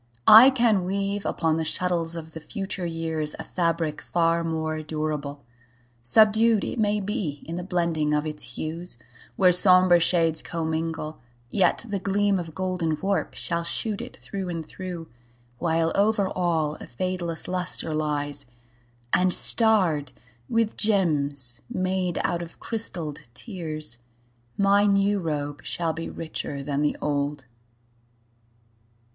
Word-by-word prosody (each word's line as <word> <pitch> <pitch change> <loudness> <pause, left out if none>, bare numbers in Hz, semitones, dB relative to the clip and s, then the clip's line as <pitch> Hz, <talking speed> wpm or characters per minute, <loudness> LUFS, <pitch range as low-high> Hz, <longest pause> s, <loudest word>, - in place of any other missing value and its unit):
I 230 +5 +10
can 235 -7 +2
weave 200 +2 -2
Upon 160 -1 0
the 165 - -1
shuttles 170 0 0
of 160 -1 -7
the 160 - -8
future 190 +1 -4
years 160 -2 -2
A - - -6
fabric 165 -3 -1
far 170 -1 +1
more 160 -1 -2
durable. 150 -2 -4 0.6
Subdued, 220 - +4
It 245 - -4
may 210 -1 +2
be, 195 - -4
in 165 - -5
the 180 - -4
blending 170 -4 0
of 150 0 +1
its 150 -6 -6
hues, 165 -1 -4 0.4
Where 185 -2 +5
somber 180 -1 +7
shades 165 -1 +2
commingle, 160 -1 -3 0.3
yet 195 +3 +2
the 200 -2 -2
gleam 200 0 +1
Of 165 -3 -7
golden 180 -4 -1
warp 195 +2 -1
shall 170 -1 -1
shoot 200 +5 -2
it - - -9
through 190 -2 -6
and 165 -3 -5
through, 180 -3 -7 0.5
While 165 -1 +1
over 205 -1 +2
all 160 -4 -1
a - - -10
fadeless 175 +3 -3
luster 180 -3 -1
lies, 145 -2 -1 0.7
And 185 0 +3
starred 180 - +4 0.4
with 230 -1 0
gems 145 - 0
made 185 -1 -1
out 175 0 -1
of 170 -1 -10
crystalled 160 - -5
tears, 155 - 0 0.6
My 200 +1 +4
new 200 0 +2
robe 145 -4 -3
shall 165 -2 -1
be 165 +1 -5
richer 150 -3 -5
than 140 0 -2
the 150 - 0
old. 145 -1 -2
170 Hz, 135 wpm, -25 LUFS, 155-190 Hz, 0.7 s, I